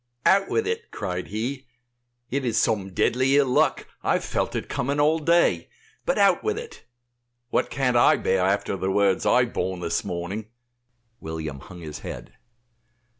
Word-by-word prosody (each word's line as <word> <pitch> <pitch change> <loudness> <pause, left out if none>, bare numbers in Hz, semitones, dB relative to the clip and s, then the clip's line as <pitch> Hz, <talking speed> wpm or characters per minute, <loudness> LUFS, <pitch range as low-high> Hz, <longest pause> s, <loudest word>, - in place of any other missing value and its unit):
"Out 195 0 +4
with 450 - +1
it," 455 +1 -3
cried 90 -2 -4
he, 125 +6 -4 0.6
"it 140 +1 -1
is 115 -3 +1
some 100 -4 0
deadly 130 +8 +2
ill 145 - +5
luck; 125 - +2 0.2
I - - +1
have - - 0
felt - - -2
it - - -3
coming 140 +3 -1
all 155 +2 +3
day, 170 +3 +2 0.4
but - - +2
out - - +4
with 435 0 -1
it; 460 0 -9 0.7
what - - +1
can't 130 -3 0
I 120 - +6
bear 95 - +1
after 100 +1 0
the 95 0 -2
words 95 -1 +2
I 125 +1 +5
have 120 - -5
borne 95 -1 -2
this 85 -1 -1
morning?" 95 +3 -4 0.7
William 80 -3 -5
hung 90 +5 -12
his 75 -2 -7
head. - - -8
115 Hz, 175 wpm, -25 LUFS, 95-140 Hz, 0.7 s, I